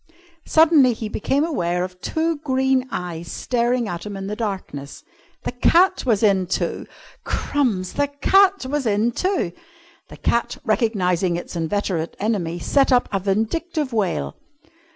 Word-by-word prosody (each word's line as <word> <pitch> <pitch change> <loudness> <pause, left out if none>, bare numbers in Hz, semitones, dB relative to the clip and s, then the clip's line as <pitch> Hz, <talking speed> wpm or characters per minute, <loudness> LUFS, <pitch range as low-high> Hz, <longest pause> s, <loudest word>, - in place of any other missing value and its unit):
Suddenly 315 -6 +5
he 220 -1 -5
became 270 +7 0
aware 180 - -1
of 180 0 -8
two 325 0 -1
green 265 -2 +1
eyes 175 -5 -5
staring 240 -1 0
at 175 -2 -5
him 205 -1 -6
in 195 - -5
the 205 +2 -3
darkness. 190 -10 -5 0.4
The - - -2
cat 345 +7 +3
was 225 -3 +2
in 195 -3 +3
too! - - -2 0.4
Crumbs! 220 -11 -1
The 285 0 +1
cat 380 +6 +3
was 275 -1 -1
in 215 +3 +2
too! 370 - -1 0.6
The - - -11
cat, 235 - 0
recognising 185 -6 +1
its 175 - -6
inveterate 170 0 -2
enemy, 190 -6 -1
set 275 +10 +2
up 250 -1 +3
a 195 - 0
vindictive 260 - -1
wail. 175 - -1
220 Hz, 145 wpm, -22 LUFS, 185-275 Hz, 0.6 s, Suddenly